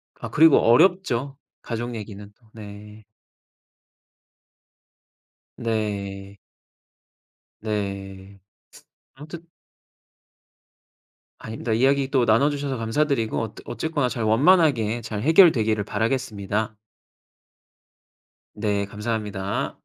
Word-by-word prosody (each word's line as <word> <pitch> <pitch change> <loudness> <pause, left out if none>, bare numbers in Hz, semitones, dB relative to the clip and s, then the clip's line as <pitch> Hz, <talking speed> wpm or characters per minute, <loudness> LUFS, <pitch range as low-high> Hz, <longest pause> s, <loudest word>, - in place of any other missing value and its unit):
아 - - -8
그리고 160 -1 +6
어렵죠 140 -2 +2 0.2
가족 120 0 -5
얘기는 105 -1 -9
또. 115 -3 -28
네. 105 0 -11 2.5
네. 100 -3 -4 1.2
네. 100 -2 -5 0.8
아무튼 160 +4 -11 1.9
아닙니다. 110 +1 -6
이야기 135 +4 +2
또 130 -4 +2
나눠 115 +7 +3
주셔서 140 -2 -3
감사드리고 115 0 -1
어 110 -1 -6
어쨌거나 150 -5 -2
잘 115 -1 -4
원만하게 120 - +3
잘 110 -1 -5
해결되기를 115 - +4
바라겠습니다. 110 -2 -2 1.8
네. 105 -1 -1
감사합니다. 105 +2 -4
110 Hz, 195 characters per minute, -23 LUFS, 105-135 Hz, 2.5 s, 그리고